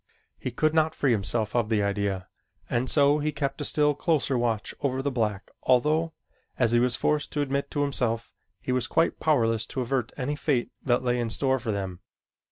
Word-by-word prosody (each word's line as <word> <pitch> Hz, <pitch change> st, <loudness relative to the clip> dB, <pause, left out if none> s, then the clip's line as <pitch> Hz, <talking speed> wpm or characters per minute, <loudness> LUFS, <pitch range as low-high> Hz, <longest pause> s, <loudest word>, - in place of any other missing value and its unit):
He -, -, -3 dB
could 155 Hz, +6 st, +1 dB
not 160 Hz, 0 st, +2 dB
free 135 Hz, -, +2 dB
himself 110 Hz, +1 st, -1 dB
of 115 Hz, -3 st, +1 dB
the 105 Hz, -2 st, +2 dB
idea 100 Hz, -2 st, -1 dB, 0.4 s
and 125 Hz, +2 st, -1 dB
so 145 Hz, 0 st, +4 dB
he 150 Hz, +1 st, 0 dB
kept 140 Hz, 0 st, -3 dB
a -, -, -1 dB
still 150 Hz, +1 st, +2 dB
closer 145 Hz, -2 st, +1 dB
watch 115 Hz, -3 st, -1 dB
over 130 Hz, -2 st, 0 dB
the 140 Hz, +1 st, -1 dB
black 110 Hz, -5 st, -2 dB
although, 155 Hz, +6 st, +2 dB, 0.4 s
as 120 Hz, -3 st, +2 dB
he 120 Hz, -, +4 dB
was 120 Hz, 0 st, +2 dB
forced 150 Hz, 0 st, 0 dB
to 150 Hz, -, 0 dB
admit 140 Hz, 0 st, -1 dB
to 145 Hz, -, 0 dB
himself, 115 Hz, -5 st, -1 dB, 0.3 s
he -, -, -4 dB
was 125 Hz, -1 st, 0 dB
quite 165 Hz, -, +1 dB
powerless 115 Hz, -7 st, +2 dB
to 130 Hz, -, -3 dB
avert 125 Hz, -2 st, -1 dB
any 145 Hz, +2 st, -2 dB
fate 140 Hz, -5 st, 0 dB
that 125 Hz, -1 st, +1 dB
lay 125 Hz, -1 st, +1 dB
in 120 Hz, -1 st, -1 dB
store 130 Hz, +3 st, +1 dB
for 115 Hz, -3 st, -3 dB
them. 95 Hz, -3 st, -4 dB
125 Hz, 200 wpm, -27 LUFS, 115-145 Hz, 0.4 s, so